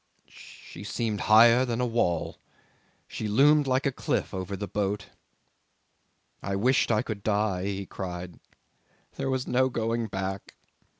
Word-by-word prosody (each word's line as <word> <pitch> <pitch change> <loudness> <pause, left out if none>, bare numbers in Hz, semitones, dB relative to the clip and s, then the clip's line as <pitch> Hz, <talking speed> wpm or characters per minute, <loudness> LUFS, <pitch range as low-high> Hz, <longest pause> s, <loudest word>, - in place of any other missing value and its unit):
"She 90 - -13
seemed 105 0 -2
higher 115 +3 +7
than 120 -2 -2
a 125 - +1
wall; 115 -8 -1 0.7
she 110 - -5
loomed 145 +7 +4
like 130 +2 +1
a 135 - +2
cliff - - -2
over 95 +1 -4
the 100 - -5
boat... 100 -1 -3 1.3
I 100 0 -3
wished 125 +7 +2
I 110 -2 +2
could 105 -3 -5
die," 100 -3 0
he 100 0 -3
cried. 90 -3 -7 0.8
"There 135 - -2
was 130 -1 -1
no 130 +1 +2
going 115 -1 -1
back. 95 -1 -5
110 Hz, 140 wpm, -27 LUFS, 100-125 Hz, 1.3 s, higher